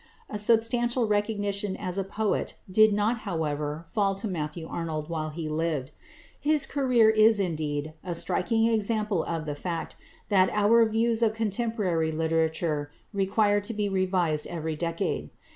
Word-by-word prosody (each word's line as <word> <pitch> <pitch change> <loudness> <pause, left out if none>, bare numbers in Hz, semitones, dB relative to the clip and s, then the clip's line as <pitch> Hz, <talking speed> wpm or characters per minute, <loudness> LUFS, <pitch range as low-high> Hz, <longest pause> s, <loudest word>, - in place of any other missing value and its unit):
A 210 - -3
substantial 235 +2 +2
recognition 205 -2 -1
as 180 +1 -3
a - - 0
poet 210 +2 -1
did 215 +3 +5
not 210 +3 +1
however 155 -5 -3
fall 195 -1 0
to 205 +3 -3
Matthew 160 -2 -4
Arnold 160 -2 -4
while 155 -1 -2
he 155 +1 -5
lived. 155 -4 -2 0.5
His 300 -1 +2
career 250 -6 +3
is, 220 0 +5
indeed, 155 -4 -2
a 175 -2 -4
striking 225 +6 0
example 215 -4 +1
of 165 -2 -3
the 150 - -3
fact 165 +3 -4 0.3
that 190 -3 +4
our 220 +2 +5
views 225 +1 +1
of 220 -2 +2
contemporary 210 -7 0
literature 160 -1 0 0.2
require 205 +1 +2
to 205 +3 -5
be 210 -1 0
revised 185 -5 0
every 160 -2 -3
decade. 165 +1 -2
195 Hz, 145 wpm, -27 LUFS, 160-220 Hz, 0.5 s, did